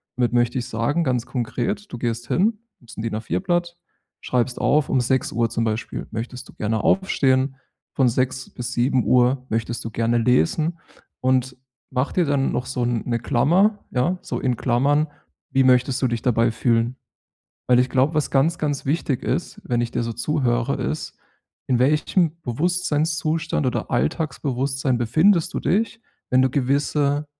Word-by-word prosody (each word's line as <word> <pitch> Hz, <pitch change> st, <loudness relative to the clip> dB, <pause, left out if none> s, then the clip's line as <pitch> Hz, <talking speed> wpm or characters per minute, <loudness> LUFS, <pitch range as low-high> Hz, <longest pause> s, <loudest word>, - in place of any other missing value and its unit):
Damit 120 Hz, -1 st, +1 dB
möchte 120 Hz, +1 st, +2 dB
ich 120 Hz, -, -5 dB
sagen, 130 Hz, +8 st, 0 dB
ganz 125 Hz, -5 st, 0 dB
konkret, 135 Hz, -, -3 dB
du -, -, -5 dB
gehst 120 Hz, 0 st, -3 dB
hin, 210 Hz, -, +1 dB, 0.2 s
nimmst 120 Hz, -, -15 dB
‘n 110 Hz, -, -4 dB
DIN-A4-Blatt, 175 Hz, -, -1 dB, 0.4 s
schreibst 125 Hz, 0 st, -1 dB
auf, 150 Hz, -1 st, +3 dB
um 130 Hz, -, +2 dB
6:00 120 Hz, -2 st, 0 dB
zum 115 Hz, -, -1 dB
Beispiel 110 Hz, +1 st, -3 dB
möchtest 120 Hz, +3 st, -6 dB
du -, -, -13 dB
gerne 110 Hz, 0 st, -1 dB
aufstehen, 135 Hz, -8 st, +2 dB, 0.4 s
von 130 Hz, -, +3 dB
6:00 130 Hz, +2 st, -1 dB
bis 125 Hz, 0 st, -6 dB
7:00 125 Hz, 0 st, +2 dB
möchtest 115 Hz, +1 st, -2 dB
du -, -, -3 dB
gerne 115 Hz, +2 st, +1 dB
lesen. 155 Hz, +8 st, +2 dB, 0.4 s
Und 130 Hz, 0 st, +1 dB, 0.3 s
mach 130 Hz, +2 st, 0 dB
dir 180 Hz, -, +2 dB
dann 140 Hz, -2 st, +1 dB
noch 125 Hz, -, -2 dB
so 125 Hz, -2 st, -1 dB
‘ne 120 Hz, 0 st, -1 dB
Klammer 175 Hz, -, +2 dB
ja, 165 Hz, +9 st, +1 dB
so -, -, -4 dB
in 125 Hz, -2 st, 0 dB
Klammern: 140 Hz, +6 st, +2 dB, 0.4 s
Wie 135 Hz, -, +3 dB
möchtest 125 Hz, +1 st, +3 dB
du 130 Hz, -, +3 dB
dich 120 Hz, -2 st, -2 dB
dabei 115 Hz, -1 st, +2 dB
fühlen? 115 Hz, +1 st, +1 dB, 0.7 s
Weil, 125 Hz, -1 st, +5 dB
ich 125 Hz, -, +1 dB
glaube, 135 Hz, +4 st, +2 dB
was 150 Hz, -1 st, 0 dB
ganz, 150 Hz, +5 st, +2 dB
ganz 145 Hz, -2 st, -2 dB
wichtig 140 Hz, -3 st, -1 dB
ist, -, -, -3 dB
wenn 120 Hz, -1 st, 0 dB
ich 120 Hz, -1 st, -1 dB
dir -, -, -1 dB
so 115 Hz, 0 st, -3 dB
zuhöre, 125 Hz, 0 st, 0 dB
ist, 70 Hz, +4 st, -4 dB, 0.5 s
in 125 Hz, -, +2 dB
welchem 155 Hz, +5 st, +2 dB
Bewusstseinszustand 160 Hz, +2 st, 0 dB
oder 125 Hz, -, -2 dB
Alltagsbewusstsein 135 Hz, -, -1 dB
befindest 170 Hz, -, +3 dB
du -, -, -1 dB
dich, 225 Hz, +4 st, 0 dB, 0.3 s
wenn 130 Hz, 0 st, +4 dB
du 130 Hz, -, +2 dB
gewisse, 145 Hz, +2 st, +1 dB
130 Hz, 160 wpm, -22 LUFS, 120-150 Hz, 0.7 s, Weil